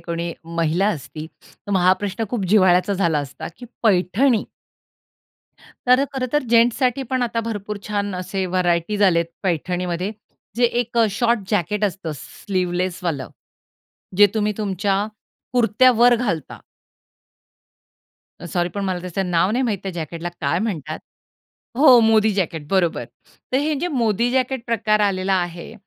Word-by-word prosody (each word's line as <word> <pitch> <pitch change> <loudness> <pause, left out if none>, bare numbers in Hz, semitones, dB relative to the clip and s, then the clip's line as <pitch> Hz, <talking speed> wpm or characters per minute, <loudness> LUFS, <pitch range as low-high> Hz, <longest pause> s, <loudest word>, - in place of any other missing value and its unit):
कोणी 170 0 -4
महिला 170 +3 0
असती, 155 -3 -5 0.2
तर 205 - -14
मग 190 - +3
हा 185 +1 +5
प्रश्न 205 +3 -2
खूप 235 -6 -2
जिव्हाळ्याचा 185 -1 +4
झाला 170 -6 +1
असता 140 -1 -6
की 245 - -10 0.2
पैठणी 215 +4 +2 1.4
तर 255 +2 +5
खरंतर 265 +2 0
जेन्ट्ससाठी 245 +3 +3
पण 255 -1 +1
आता 230 -1 -1
भरपूर 210 -1 -5
छान 205 -1 -2
असे 190 +1 -3
व्हरायटीज 180 +3 +1
आलेत 170 -2 +1 0.2
पैठणीमध्ये. 180 +2 -2 0.4
जे 245 - +3
एक 235 0 0
अ, 225 - +5
शॉर्ट 230 +2 +1
जॅकेट 210 +1 0
असतं 185 -5 -3
स्लीवलेसवालं, 180 -3 -3 0.9
जे 205 - +8
तुम्ही 210 -1 +1
तुमच्या 200 0 0 0.5
कुर्त्यावर 245 0 +4
घालता. 185 - -3 1.9
सॉरी 175 -1 0
पण 200 +2 -4
मला 185 -2 -1
त्याच 180 +1 -7
नाव 180 +1 +2
नाही 250 +4 +1
माहित, 215 -6 -1
त्या 195 -2 -4
जॅकेटला 170 +1 -5
काय 170 - 0
म्हणतात? 160 -8 -3 0.8
हो, 260 -3 +7
मोदी 220 -1 +4
जॅकेट 165 -6 -2
बरोबर. 175 -9 +1 0.5
तर - - +3
हे 300 +2 0
जे 355 - -1
मोदी 235 - +1
जॅकेट 260 0 0
प्रकार 220 -2 +1
आलेला 195 -1 +1
आहे, 175 +2 -3
200 Hz, 135 wpm, -21 LUFS, 175-230 Hz, 1.9 s, जे